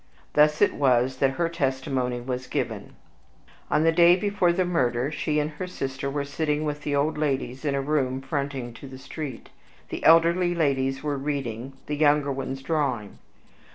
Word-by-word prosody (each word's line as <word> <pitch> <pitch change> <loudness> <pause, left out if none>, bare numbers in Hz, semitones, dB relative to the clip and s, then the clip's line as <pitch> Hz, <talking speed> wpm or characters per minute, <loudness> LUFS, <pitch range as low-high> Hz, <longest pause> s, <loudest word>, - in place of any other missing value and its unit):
Thus 150 +3 +4
it - - +3
was 130 -2 +2
that 135 0 +2
her 170 - +2
testimony 130 -5 -1
was 125 0 -4
given: - - -4 0.7
On 155 - +2
the 165 - +5
day 170 +1 +6
before 195 -2 +1
the 185 +1 +1
murder, 130 -6 0
she 150 0 -1
and 150 +1 -1
her 170 +5 -6
sister 135 -5 -4
were 140 0 -2
sitting 150 +1 -1
with 150 -1 -3
the 145 0 -1
old 150 +2 0
ladies 135 -3 -2
in 145 -2 0
a 140 - 0
room 135 -2 0
fronting 135 -3 -3
to 135 - -11
the 130 0 -10
street; 135 -1 -7 0.4
the - - -5
elder 165 +1 +6
ladies 145 -7 0
were 145 -2 -1
reading, 135 -3 -4
the 150 - -3
younger 145 -1 +3
ones 135 0 -4
drawing. 135 -9 -2
140 Hz, 175 wpm, -25 LUFS, 130-155 Hz, 0.7 s, day